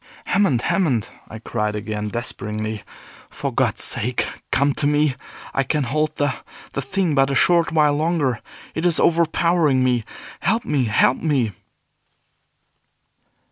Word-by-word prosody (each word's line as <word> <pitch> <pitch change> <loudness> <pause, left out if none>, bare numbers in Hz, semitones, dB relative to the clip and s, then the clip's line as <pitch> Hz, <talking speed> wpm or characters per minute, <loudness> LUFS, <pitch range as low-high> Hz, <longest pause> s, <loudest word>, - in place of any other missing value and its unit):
"Hammond! 175 - +2
Hammond!" 135 - +1 0.2
I 110 - -8
cried 105 -1 -2
again, 105 0 -3
despairingly, 110 -2 -4 0.5
"for - - -4
God's - - +1
sake 120 +2 0 0.3
come 140 +1 +2
to 145 - 0
me. 150 -1 +2 0.4
I 135 - +2
can 150 +2 0
hold 155 +5 -1
the 145 -2 0 0.4
the 140 - -2
thing 175 +4 -1
but 135 -1 +3
a 140 - 0
short 170 +3 +3
while 150 -2 +3
longer. 150 -6 0 0.3
It 160 - -3
is 175 -2 +3
overpowering 165 -4 +3
me. 125 -2 +1 0.4
Help 225 +4 0
me! 135 -4 +1
Help 110 +2 +3
me!" 135 -9 0
140 Hz, 140 wpm, -21 LUFS, 120-160 Hz, 0.5 s, but